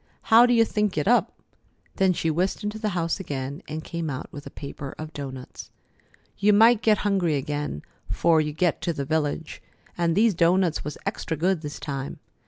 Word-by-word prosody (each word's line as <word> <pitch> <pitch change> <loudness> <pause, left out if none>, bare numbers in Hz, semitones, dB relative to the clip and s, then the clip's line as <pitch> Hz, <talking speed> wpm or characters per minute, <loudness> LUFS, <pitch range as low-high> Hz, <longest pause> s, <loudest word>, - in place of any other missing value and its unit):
How 235 +2 +9
do 245 - +3
you 230 -1 +5
think 210 -4 -1
it 150 - 0
up?" 245 +2 +2 0.6
Then 190 -1 +4
she 165 -2 0
whisked 185 +6 -1
into 210 +1 -3
the 215 -1 -1
house 165 +3 -1
again 140 -5 -5
and 155 +1 -5
came 170 -2 -4
out 130 -2 -6
with 145 -1 -8
a - - -6
paper 140 -1 -8
of 155 0 -7
doughnuts. 130 -3 -8 0.7
"You 205 +1 +4
might 225 +2 +6
get 215 -2 +4
hungry 185 -6 +2
again 145 - -3 0.3
'fore 165 -2 +3
you 150 0 -2
get 165 +2 0
to 170 - -1
the 140 -3 -3
village, 155 +1 -2 0.3
and 170 -1 +1
these 220 +2 +4
doughnuts 170 0 +2
was 150 - -5
extra 160 - -3
good 180 +1 +1
this 150 -2 -6
time. 135 -2 -5
165 Hz, 190 wpm, -25 LUFS, 150-195 Hz, 0.7 s, How